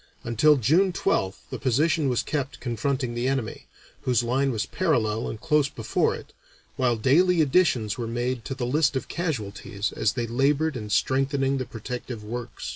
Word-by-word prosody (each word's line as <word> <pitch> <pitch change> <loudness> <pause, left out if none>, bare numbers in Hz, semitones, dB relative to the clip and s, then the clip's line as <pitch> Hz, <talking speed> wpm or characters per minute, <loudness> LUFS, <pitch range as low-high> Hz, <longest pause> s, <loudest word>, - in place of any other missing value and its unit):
Until 130 +6 +4
June 165 - +3
12th 100 - -1
the - - -4
position 145 +3 +2
was 125 - +1
kept 140 -2 -3
confronting 125 +1 -2
the 120 +2 -1
enemy, 130 -4 -2 0.3
whose 125 -2 +1
line 135 +3 +1
was 115 -2 -1
parallel 115 -11 0
and 110 - -6
close 150 -1 +2
before 115 -5 0
it, - - -12 0.4
while 125 -2 +2
daily 170 +10 +4
additions 130 - +2
were 115 - -2
made 120 +1 -2
to 135 - -4
the 125 -2 -3
list 145 +3 +2
of 130 - -2
casualties 110 - -3
as 100 - 0
they 120 - -2
labored 140 +6 +1
in 105 -3 -5
strengthening 135 +4 +1
the 130 - -2
protective 120 -1 -6
works. 120 +2 -6
130 Hz, 170 wpm, -25 LUFS, 115-145 Hz, 0.4 s, Until